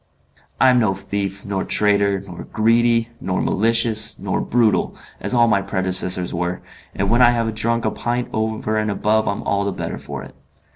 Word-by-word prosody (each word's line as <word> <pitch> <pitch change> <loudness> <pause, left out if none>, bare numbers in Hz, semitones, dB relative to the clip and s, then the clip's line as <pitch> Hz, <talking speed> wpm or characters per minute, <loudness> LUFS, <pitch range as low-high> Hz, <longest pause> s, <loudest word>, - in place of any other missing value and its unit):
"I'm 130 -2 +5
no 105 -5 +1
thief, 100 0 -4
nor 100 -2 -2
traitor, 100 -2 +1
nor 90 -3 -9
greedy, 115 +1 +2
nor 90 -1 -2
malicious, 110 0 +2
nor - - -2
brutal, 115 -3 +1 0.2
as - - -2
all 120 -1 +5
my 100 -3 +2
predecessors 95 -2 0
were, 90 +1 -3 0.3
and 100 - -1
when 120 +2 +4
I 120 - +7
have 115 -2 0
drunk 115 +1 -1
a 110 - +1
pint 120 +1 -2
over 110 0 -1
and 110 0 0
above 110 +2 +1
I 100 - +1
am - - -7
all 100 0 0
the 100 - -1
better - - -5
for - - -7
it. - - -12
110 Hz, 185 wpm, -20 LUFS, 100-115 Hz, 0.3 s, I